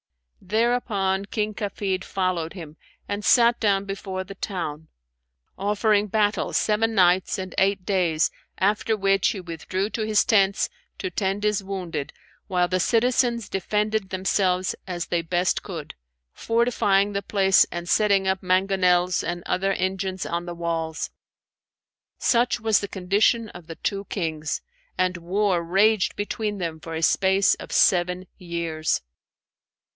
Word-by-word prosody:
Thereupon 205 -2 0
King 215 +1 -2
Kafid 200 -3 -3
followed 185 -5 -2
him 160 -5 -9 0.3
and 205 +1 -3
sat 235 0 +5
down 200 -2 +2
before 195 -1 -4
the 195 +1 -9
town; 165 -6 -5 0.7
offering 210 +1 +2
battle 210 0 +1
seven 220 +1 +1
nights 180 -1 +3
and 185 -2 -5
eight 195 -1 +1
days, 175 -6 +1 0.3
after 215 +3 +1
which 195 -1 +2
he 215 - -3
withdrew 185 +4 -4
to 225 - -3
his 215 -1 +2
tents, 200 -3 +3 0.3
to 185 - -4
tend 195 +2 -1
his 210 -2 +1
wounded 180 -7 -4 0.4
while 180 -2 +1
the 185 +1 0
citizens 235 +2 +2
defended 210 +1 -1
themselves 185 -1 0
as 175 -2 -3
they 170 - 0
best 175 +2 0
could, 165 -7 -7 0.4
fortifying 205 -4 +1
the 200 - -1
place 195 -2 +4
and 175 0 -5
setting 200 -1 +3
up 190 0 0
mangonels 185 -1 +2
and 175 0 -4
other 195 +2 0
engines 190 0 -2
on 170 +1 -3
the 175 - -5
walls. 165 -2 -3 1.1
Such 240 0 +2
was 220 -1 +3
the 200 - -4
condition 205 +5 +1
of 175 -4 -12
the 165 - -7
two 200 +3 -3
Kings, 160 -6 -3 0.4
and 185 0 +1
war 185 +1 0
raged 195 +4 +2
between 205 0 -3
them 165 -4 -4
for 165 0 -7
a 160 - -3
space 190 +3 +4
of - - -10
seven 180 0 +3
years." 170 -3 -2
190 Hz, 140 wpm, -24 LUFS, 180-205 Hz, 1.1 s, sat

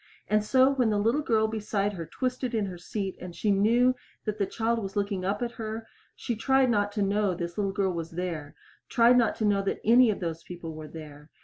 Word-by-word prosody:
And 215 0 +2
so 260 +4 +4
when 250 -4 +2
the 210 - +1
little 230 +8 +2
girl 220 -6 +2
beside 210 -2 -1
her 165 -4 -6
twisted 255 -1 -2
in 215 -2 +1
her 185 -2 -6
seat 195 +1 -4
and 175 -1 -8
she 210 - +1
knew 230 +6 +4 0.3
that 215 -1 -3
the 200 - +1
child 230 +1 0
was 195 0 -6
looking 200 -2 -1
up 200 +5 -1
at 235 - -2
her 220 +1 -4 0.3
she 235 - -3
tried 265 +2 +3
not 205 -2 +1
to 205 -2 0
know 200 -1 +1
this 170 -1 -5
little 200 -2 0
girl 195 -2 0
was 165 -1 -4
there 165 -4 -5 0.3
tried 235 +1 +5
not 240 -2 +3
to 220 - -1
know 200 -1 +3
that 195 - -2
any 240 +2 +6
of 210 - -1
those 165 -2 -4
people 175 -2 -8
were 155 0 -8
there. 150 -1 -11
205 Hz, 230 wpm, -28 LUFS, 185-230 Hz, 0.3 s, any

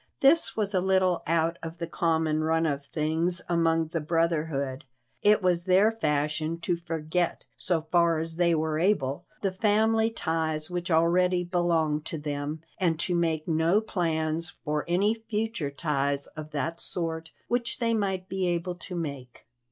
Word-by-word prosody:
This 285 +1 +4
was 210 -1 0
a 185 - +2
little 190 -1 +2
out 165 +1 +1
of 165 +1 -7
the 170 - -3
common 160 -2 0
run 165 +1 +2
of 145 -2 -1
things 165 +3 0
among 165 -2 +2
the 165 - -2
brotherhood; 155 -4 -1 0.4
it 210 -1 +4
was 175 -1 +3
their 195 +4 +5
fashion 155 -4 -1
to 175 +1 0
forget, 170 0 -2
so 170 -4 -1
far 170 0 +3
as 165 +1 -4
they 170 -1 +3
were 155 0 0
able, 170 -5 +1 0.2
the 195 - 0
family 220 +3 +2
ties 160 -5 -1
which 175 0 -3
already 180 +2 +3
belonged 170 -4 +1
to 160 - -3
them, 145 +1 -4 0.2
and 165 -4 +1
to 180 - 0
make 165 -2 0
no 165 +4 +3
plans 165 -5 -1 0.2
for 150 -1 -1
any 195 +5 +2 0.2
future 215 -8 -1
ties 140 -1 0
of 155 0 -9
that 165 +3 -3
sort 165 -2 -3 0.2
which 240 0 -1
they 230 -1 +1
might 190 -4 -1
be 190 -1 -1
able 175 +1 -1
to 180 +1 -8
make. 140 -7 -6
165 Hz, 160 wpm, -27 LUFS, 155-180 Hz, 0.4 s, their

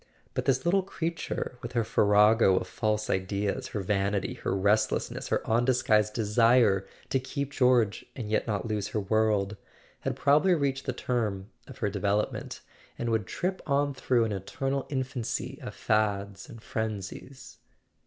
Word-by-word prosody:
But - - -2
this 130 +1 +1
little 190 +3 +3
creature, 165 -8 -4
with 120 +1 -7
her 120 -2 +2
farrago 105 -1 +4
of - - -1
false 110 -1 -1
ideas, 100 +6 -1
her 105 -5 -4
vanity, 100 0 0
her - - -5
restless¬ 100 +3 +1
ness, - - -6
her - - -1
undisguised 115 -3 +2
desire 110 -2 +3 0.2
to 135 - +2
keep 140 +2 -4
George 125 -6 +3
and 120 -5 -5
yet 110 +2 0
not 105 0 -2
lose 105 -2 -2
her 105 - -2
world, 105 -1 +1 0.4
had - - -2
probably 155 +6 +4
reached 140 -3 -1
the - - +1
term 110 -5 -2 0.2
of - - -11
her 105 - 0
development, 105 +2 -1 0.4
and 120 -1 -2
would 110 -4 0
trip 185 - -2
on 140 0 +1
through 125 -2 +1
an 110 - -2
eternal 135 +8 -3
infancy 130 -3 -3
of - - -7
fads 100 -2 -1
and 115 -1 -11
frenzies. 110 +4 -5
110 Hz, 155 wpm, -28 LUFS, 105-130 Hz, 0.4 s, farrago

